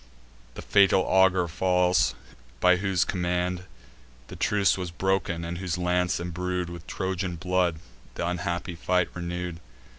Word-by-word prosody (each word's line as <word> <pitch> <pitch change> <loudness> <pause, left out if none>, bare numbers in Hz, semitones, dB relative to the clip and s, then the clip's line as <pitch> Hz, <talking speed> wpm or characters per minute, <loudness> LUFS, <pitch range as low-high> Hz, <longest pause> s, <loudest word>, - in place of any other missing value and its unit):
The - - -7
fatal 100 -1 +5
augur 95 -2 +3
falls, 90 0 +2 0.4
by 90 0 +5
whose 95 -3 +1
command 90 0 -1 0.6
The - - -8
truce 100 -2 +2
was 90 -2 -4
broken, 90 -1 -1
and 85 +1 -4
whose 90 -2 -2
lance, 90 -2 +1
embrued 90 +1 -3
With 85 -1 -9
Trojan 95 -1 -3
blood, 90 -1 +1 0.4
th' - - -12
unhappy 90 0 -2
fight 90 +1 0
renew'd. 90 -1 -4
90 Hz, 130 wpm, -26 LUFS, 85-95 Hz, 0.6 s, fatal